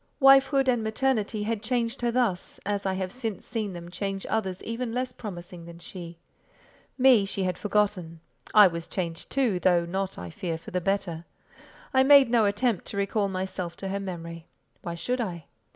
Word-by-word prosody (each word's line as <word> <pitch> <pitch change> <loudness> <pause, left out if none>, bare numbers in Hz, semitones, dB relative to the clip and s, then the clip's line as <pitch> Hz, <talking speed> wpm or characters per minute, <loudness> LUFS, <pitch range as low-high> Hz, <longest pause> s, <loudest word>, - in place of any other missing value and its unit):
Wifehood 270 0 +6
and 245 -3 +2
maternity 220 -2 0
had 220 0 -2
changed 235 0 -1
her 240 - +1
thus, 230 -7 -1
as 200 0 -1
I 190 - +1
have 185 -1 -3
since 225 -5 -4
seen 215 -4 -3
them 175 0 -9
change 195 +1 -3
others 190 -4 -1
even 230 +1 -3
less 255 0 -2
promising 175 -7 -8
than 170 0 -11
she. 170 0 -8 0.8
Me 255 -5 +6
she 195 0 -2
had 185 -1 0
forgotten. 200 -6 -1 0.3
I 210 -1 +9
was 170 -2 -1
changed 170 -3 -4
too, 245 -9 +1
though 175 -2 +3
not, 190 +2 -3
I 90 -1 -7
fear, 165 - -3
for 160 - -11
the 180 - -1
better. 175 -3 -1 0.7
I 260 - +5
made 270 -2 +7
no 230 -3 +4
attempt 205 0 +1
to - - -4
recall 200 +1 +1
myself 185 -2 -4
to 195 - -5
her 200 +1 -2
memory; 170 -3 -7 0.3
why 170 -1 -5
should 245 +9 -2
I? 170 -8 -4
200 Hz, 185 wpm, -27 LUFS, 175-230 Hz, 0.8 s, I